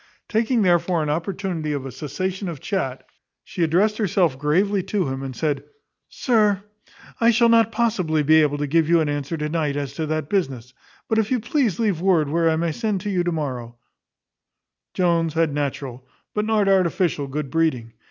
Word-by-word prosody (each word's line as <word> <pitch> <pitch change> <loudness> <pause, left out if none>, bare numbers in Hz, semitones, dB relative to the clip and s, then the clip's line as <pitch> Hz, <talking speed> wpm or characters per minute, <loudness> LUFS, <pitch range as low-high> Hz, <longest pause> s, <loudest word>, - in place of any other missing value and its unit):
Taking 225 +1 +1
therefore 175 -2 +2
an 150 - -1
opportunity 170 -1 -3
of 140 -2 -4
a 135 - -6
cessation 185 - -4
of 160 -5 -6
chat, 135 -7 -3 0.4
she - - -6
addressed 190 +7 +2
herself 180 -7 +2
gravely 185 +9 +1
to 190 -2 -1
him, 135 0 -4
and 135 -2 -6
said, 145 +2 -1 0.5
"Sir, 210 -5 +1 0.6
I 230 - +4
shall 235 0 +4
not 230 -1 +4
possibly 195 -10 +1
be 155 +2 +5
able 145 -1 +1
to 145 - -1
give 160 +2 +2
you 170 0 +5
an 155 - 0
answer 145 +2 -3
to 150 0 -2
night 150 -2 -1
as 140 -2 -4
to 160 - -2
that 155 -1 -2
business; 135 - -2 0.3
but 220 - +1
if 220 -1 0
you 255 - +1
please 230 - 0
to 230 - -2
leave 195 -7 0
word 175 -6 +2
where 165 +2 +2
I 160 - +2
may 165 +1 0
send 215 +1 -2
to 205 +2 -3
you 180 -2 +1
to 175 - -1
morrow 125 -7 -4 0.6
" - - -62
Jones 170 -3 +1
had 165 -3 +1
natural, 135 -3 -4 0.3
but 210 0 -1
not 215 -2 +2
artificial 180 -5 +1
good 140 0 -4
breeding. 130 -9 0
165 Hz, 195 wpm, -22 LUFS, 145-200 Hz, 0.6 s, be